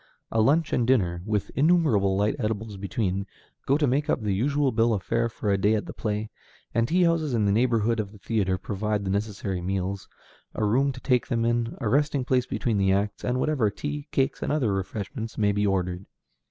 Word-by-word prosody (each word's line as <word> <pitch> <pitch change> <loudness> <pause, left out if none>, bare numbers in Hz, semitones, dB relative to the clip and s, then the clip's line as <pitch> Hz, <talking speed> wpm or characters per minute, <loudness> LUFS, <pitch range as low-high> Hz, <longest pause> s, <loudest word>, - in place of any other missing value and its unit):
A 110 - +2
lunch 145 +7 +2
and 120 - +1
dinner, 90 -10 +2
with 105 -2 -1
innumerable 140 - +3
light 105 +2 +1
edibles 110 -2 -3
between, 100 0 -2 0.4
go 140 - +4
to 150 - +2
make 140 +3 0
up - - +2
the 105 -3 -1
usual 140 +6 +1
bill 115 0 +2
of 95 - -4
fare 115 0 0
for 105 -2 -2
a 100 - +2
day 105 +3 +3
at 105 - -2
the - - -7
play, 105 0 -3 0.4
and 115 0 +2
tea 180 +5 +3
houses 165 -6 +1
in 110 -2 +2
the 100 - +3
neighborhood 115 0 +2
of 100 -2 -3
the 105 - -14
theatre 95 -3 0
provide 105 +2 -2
the 95 - -1
necessary 100 -2 -2
meals, 95 +1 -3 0.5
a 110 - 0
room 135 +7 +2
to 125 -1 -10
take 125 -2 +1
them 115 -1 0
in, 120 0 0
a 115 - -2
resting 145 +2 +1
place 125 -1 +1
between 115 -5 -1
the 95 -1 +3
acts, 100 +2 -1
and 125 +1 0
whatever 130 -6 +1
tea, 145 +7 -5
cakes, 135 -1 0
and - - -1
other 130 -9 +1
refreshments 100 +4 -4
may 105 -1 +3
be 105 0 +1
ordered. 90 -1 -1
110 Hz, 215 wpm, -26 LUFS, 100-130 Hz, 0.5 s, go